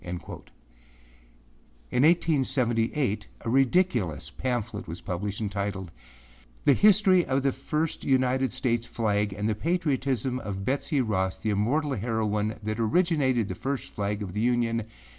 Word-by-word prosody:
â - - -12 1.8
In 125 - +2
1878, 130 - +2
a - - -4
ridiculous 120 - +1
pamphlet 120 -1 -3
was 85 +2 -6
published, 100 +3 -4
entitled 100 -3 -3 0.7
âThe 140 - +7
History 200 -1 +5
of 135 -2 0
the 135 - +3
First 150 +4 -2
United 130 0 +2
States 120 -2 -1
Flag 105 -3 0
and 105 +2 -2
the 110 - +1
Patriotism 135 - -1
of 95 -4 -5
Betsey 140 +1 0
Ross, 95 -5 -1
the 110 - -2
Immortal 135 +9 +1
Heroine 110 -2 -1
that 110 +1 -3
Originated 130 - +2
the - - -4
First 135 0 -4
Flag 105 +1 -2
of 95 -3 -6
the 105 - -1
Union. 115 -2 +1
120 Hz, 135 wpm, -27 LUFS, 105-135 Hz, 1.8 s, âThe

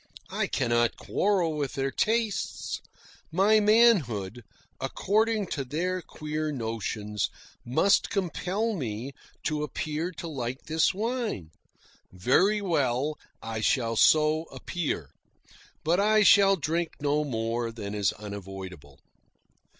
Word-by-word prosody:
I - - 0
cannot 120 -2 +1
quarrel 185 -6 +1
with 145 -3 -2
their 135 0 -1
tastes. 220 - -1 0.5
My 200 +6 +4
manhood, 155 - +3 0.4
according 215 +1 +1
to 140 - -2
their 180 +7 -2
queer 155 -1 -4
notions, 110 -4 -3 0.3
must 190 +12 +3
compel 195 +4 -1
me 125 - -4 0.3
to 150 -1 -1
appear 155 +2 -3
to 165 +1 -7
like 130 -4 -4
this 160 +1 +2
wine. 215 - -3 0.6
Very 180 - +3
well. 150 -5 0 0.2
I 115 -1 -4
shall 115 0 +1
so 155 +5 +4
appear. 150 - -4 0.7
But 170 +4 +2
I 215 +1 +4
shall 195 -1 +7
drink 165 0 -1
no 145 +1 +1
more 115 -3 -2
than 105 -3 -6
is 105 -2 +1
unavoidable. 95 -8 -8
150 Hz, 110 wpm, -28 LUFS, 115-190 Hz, 0.7 s, shall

